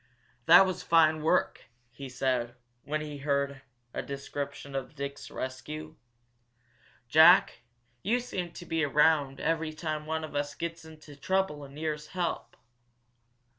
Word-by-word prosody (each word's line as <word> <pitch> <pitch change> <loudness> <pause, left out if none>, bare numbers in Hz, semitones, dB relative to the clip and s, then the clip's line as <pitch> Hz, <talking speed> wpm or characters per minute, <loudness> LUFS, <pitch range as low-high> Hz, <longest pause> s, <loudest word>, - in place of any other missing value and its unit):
"That 175 +3 +9
was 185 -2 -3
fine 160 -2 +4
work!" 160 - +1 0.3
he 135 +3 -9
said, 125 -2 -1 0.3
when 150 +2 -2
he 150 -2 -6
had 140 - -11
heard 140 -1 0 0.3
a - - -2
description 140 0 -6
of 135 +1 -5
Dick's 140 0 -6
rescue. 150 +5 -6 1.1
"Jack, 160 +8 +6 0.4
you 230 +6 +1
seem 185 -8 -5
to 175 - -9
be 165 -1 0
around 145 -1 +3
every 160 -1 -1
time 155 -1 -4
one 160 0 -2
of 155 - -7
us 145 0 -2
gets 170 0 -5
into 155 -2 -13
trouble 185 -1 -1
and 140 0 -12
needs 150 -1 -3
help!" 175 -2 -4
150 Hz, 140 wpm, -29 LUFS, 140-160 Hz, 1.1 s, That